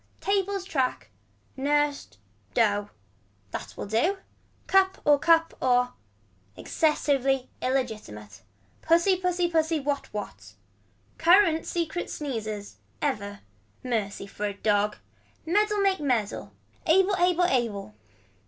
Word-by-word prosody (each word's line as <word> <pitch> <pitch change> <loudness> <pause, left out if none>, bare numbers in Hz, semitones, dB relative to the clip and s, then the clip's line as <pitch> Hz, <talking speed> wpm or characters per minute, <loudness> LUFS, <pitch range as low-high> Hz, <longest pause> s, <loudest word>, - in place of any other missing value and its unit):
Tables 395 -1 0
track. 265 -9 -2 0.4
Nursed. 290 +1 0 0.4
Dough. 205 -3 +2 0.6
That - - -6
will - - -4
do. 235 - +1 0.5
Cup 380 0 +3
or 290 -1 +5
cup 330 +1 +4
or. 250 -1 +2 0.6
Excessively 275 -4 +1
illigitimate. 215 - -3 0.4
Pussy 340 +4 +4
pussy 360 -1 0
pussy 320 -1 +1
what 285 0 -3
what. 210 -1 -7 0.6
Current 335 -1 +4
secret 345 0 -2
sneezers. 215 -8 -5 0.2
Ever. 205 -8 -3 0.4
Mercy 215 -6 -2
for 205 +1 -4
a 200 - -5
dog. 210 0 +1 0.5
Medal 420 +4 +2
make 390 -1 +2
medal. 245 -8 -1 0.4
Able 380 +4 +4
able 355 0 +3
able. 230 - -1
285 Hz, 105 wpm, -27 LUFS, 220-350 Hz, 0.6 s, or